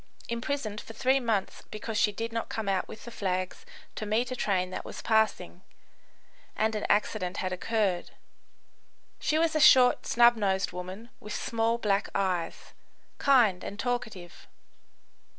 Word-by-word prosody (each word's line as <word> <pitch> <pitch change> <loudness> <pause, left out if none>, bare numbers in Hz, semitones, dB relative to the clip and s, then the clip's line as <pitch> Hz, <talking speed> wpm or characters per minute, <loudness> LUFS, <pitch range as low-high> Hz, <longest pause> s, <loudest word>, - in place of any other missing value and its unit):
] - - -20
imprisoned 235 -4 -3
for 225 - -11
three 260 +4 +2
months 225 -6 -1
because 215 +1 -6
she 210 - +3
did 225 +3 -5
not 230 - -3
come 220 -2 -4
out 195 -1 0
with - - -11
the 240 - -8
flags 185 - -3 0.3
to - - -6
meet 225 +4 0
a - - -2
train 185 -5 0
that - - -5
was - - -8
passing, 220 -5 +1 0.9
and 220 +1 +1
an 210 - -2
accident 185 -3 0
had 185 -1 -2
occurred. 195 -2 -1 1.1
She 310 - +1
was 325 0 +1
a - - +3
short, 255 -4 +6
snub 240 0 +5
nosed 195 -3 0
woman, 185 +6 -8
with 210 - -7
small, 230 0 0
black 205 -3 0
eyes; 185 -4 -2 0.5
kind 240 -10 +4
and 200 - -6
talkative. 220 -8 -4
215 Hz, 155 wpm, -28 LUFS, 190-235 Hz, 1.1 s, short